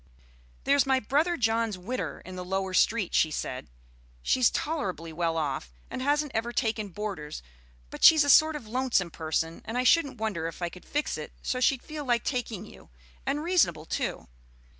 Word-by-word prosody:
"There's 280 0 +3
my 265 -1 +3
brother 300 +9 +1
John's 225 -3 +1
widder 180 - -4
in 185 +1 -8
the 180 - -5
lower 190 +1 -2
street," 210 0 +2
she 160 - +4
said. 130 -4 -4 0.6
"She's 255 -3 +4
tolerably 185 - -3
well 165 0 -1
off, 140 - -2 0.2
and - - -4
hasn't 290 +1 +1
ever 230 +2 -1
taken 220 -3 -1
boarders; 180 - -5 0.5
but - - -8
she's 315 -2 +9
a 285 - 0
sort 315 +3 +6
of 290 -6 -6
lonesome 235 -7 0
person, 160 +1 -2
and 225 +3 -4
I 250 - +2
shouldn't 285 +2 +3
wonder 205 -7 -2
if 165 - -8
I 175 -1 -2
could 180 +1 -14
fix 295 +1 -2
it - - -8
so 255 - -1
she'd 255 0 +2
feel 305 -1 -6
like 240 -4 +1
taking 230 -6 -3
you, - - -15 0.4
and 290 +2 0
reasonable 175 - +2
too. - - -3
225 Hz, 180 wpm, -28 LUFS, 175-270 Hz, 0.6 s, she's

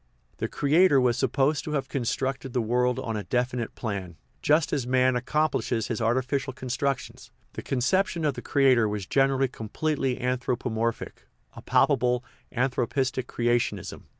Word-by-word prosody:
The - - -2
creator 150 +1 +4
was 125 -2 +2
supposed 135 +3 +1
to 150 - -4
have 140 -2 -1
constructed 135 0 -2
the 125 - +1
world 125 +2 +1
on 115 - -3
a 105 - -2
definite 125 -1 -2
plan, 95 -7 -5 0.2
just 150 +1 +2
as 135 -5 -1
man 130 0 +3
accomplishes 125 -3 0
his 115 -1 -2
artificial 130 +4 0
constructions; 130 +1 -3 0.2
the - - -6
concep 160 +10 +1
tion 165 -2 -3
of 145 - +2
the - - -7
creator 130 -6 +3
was 105 -2 -3
generally 135 +3 +2
completely 130 +3 -2
anthropo 125 -1 -2
morphic, 115 +1 -3 0.3
a - - -10
palpable 125 -3 +2 0.2
" - - -39
anthropistic 130 0 0
creationism." 120 0 -1
130 Hz, 150 wpm, -26 LUFS, 120-135 Hz, 0.3 s, creator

